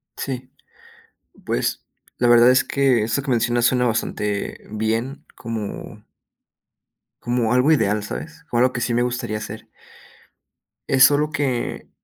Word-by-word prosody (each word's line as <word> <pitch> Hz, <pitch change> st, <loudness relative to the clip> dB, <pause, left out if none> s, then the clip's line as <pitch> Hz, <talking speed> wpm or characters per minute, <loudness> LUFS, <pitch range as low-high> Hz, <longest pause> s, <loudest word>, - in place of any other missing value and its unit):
Sí, 130 Hz, -2 st, -5 dB, 0.9 s
pues, -, -, -2 dB, 0.3 s
la 120 Hz, -, +2 dB
verdad 120 Hz, +1 st, +7 dB
es 130 Hz, -, +4 dB
que, 135 Hz, -5 st, +2 dB
eso 115 Hz, +5 st, -1 dB
que 135 Hz, -, -3 dB
mencionas 120 Hz, 0 st, +1 dB
suena 125 Hz, 0 st, +2 dB
bastante 105 Hz, -3 st, -2 dB
bien, 115 Hz, +6 st, -2 dB
como 110 Hz, -3 st, -6 dB, 1.2 s
como 120 Hz, -2 st, 0 dB
algo 125 Hz, +5 st, +4 dB
ideal, 105 Hz, -8 st, +2 dB
¿sabes?, 165 Hz, +9 st, -7 dB
como 120 Hz, -, 0 dB
algo 130 Hz, 0 st, +3 dB
que 120 Hz, -, -3 dB
sí 120 Hz, -, -1 dB
me 120 Hz, -, +2 dB
gustaría 120 Hz, -3 st, -2 dB
hacer 110 Hz, +1 st, -8 dB, 1.2 s
es 135 Hz, -3 st, +5 dB
solo 145 Hz, +2 st, +5 dB
que 135 Hz, -5 st, -2 dB
120 Hz, 135 wpm, -21 LUFS, 110-130 Hz, 1.2 s, verdad